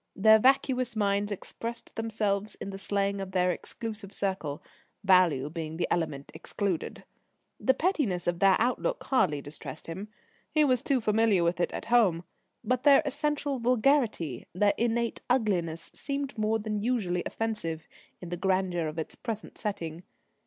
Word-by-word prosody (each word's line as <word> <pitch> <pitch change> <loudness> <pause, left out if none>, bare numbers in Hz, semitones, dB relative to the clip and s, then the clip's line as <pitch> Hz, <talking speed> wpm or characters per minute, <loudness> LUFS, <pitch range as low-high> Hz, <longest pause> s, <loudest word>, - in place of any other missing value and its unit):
Their 220 +2 +6
vacuous 255 -1 +3
minds 205 -1 +1
expressed 230 +4 -6
themselves 215 -2 -1
in 200 - -6
the 195 - -7
slang 200 0 0
of 190 -1 -6
their 180 -1 +3
exclusive 215 +2 -6
circle 190 -7 -2 0.4
value 180 -8 +4
being 160 0 -5
the 175 - 0
element 150 -5 -2
excluded. 195 -5 -3 0.6
The 260 - +3
pettiness 270 - 0
of 175 0 0
their 195 0 +6
outlook 255 - 0
hardly 170 - +2
distressed 150 +2 -8
him 190 +5 -6 0.4
he 305 0 +3
was 255 -4 +3
too 275 -3 +1
familiar 215 -4 +3
with 170 +1 +1
it 175 - +1
at - - -5
home 185 -8 +4 0.4
but 250 +2 0
their 285 +2 +6
essential 290 -1 -1
vulgarity, 235 - +1
their 205 +3 +3
innate 235 0 0
ugliness, 185 -10 0
seemed 280 -1 -3
more 220 0 +1
than 215 -1 -3
usually 205 -7 0
offensive 170 -8 -3 0.3
in 175 - -8
the 175 - -3
grandeur 185 -3 0
of 155 +1 -6
its 160 - -4
present 220 -3 -6
setting. 170 -6 -4
205 Hz, 150 wpm, -29 LUFS, 175-235 Hz, 0.6 s, Their